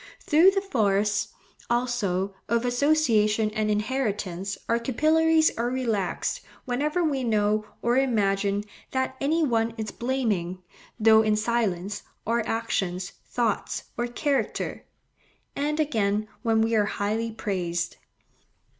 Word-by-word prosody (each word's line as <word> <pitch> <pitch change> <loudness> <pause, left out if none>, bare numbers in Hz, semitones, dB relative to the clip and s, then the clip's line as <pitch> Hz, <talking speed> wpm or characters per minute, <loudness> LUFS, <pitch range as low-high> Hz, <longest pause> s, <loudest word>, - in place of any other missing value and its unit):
Through 325 +5 +5
the 390 0 0
force, 205 - +1 0.4
also, 215 -6 0 0.2
of 235 +1 +1
association 240 -6 +2
and 215 0 -1
inheritance 210 -4 -1
our 230 0 +2
capillaries 315 +6 +3
are 240 +1 +1
relaxed, 245 - -1 0.2
whenever 295 +7 0
we 280 -5 0
know, 215 -2 +1 0.2
or 240 +1 +2
imagine, 205 -5 +1 0.3
that 260 0 -1
any 315 +4 +2
one 230 -4 +1
is 220 -2 -4
blaming, 210 -8 -2 0.4
though 220 0 +6
in 215 -1 +2
silence, 210 -4 -1 0.2
our 235 +2 +1
actions, 190 -5 -2 0.2
thoughts, 230 -4 -1
or 240 - -1
character; 260 -1 -2 0.7
and, 300 +2 -1
again, 215 -8 +1
when 225 -1 +2
we 225 +1 +1
are 210 -2 +4
highly 215 +3 -1
praised. 175 -6 -2
225 Hz, 120 wpm, -26 LUFS, 205-260 Hz, 0.7 s, though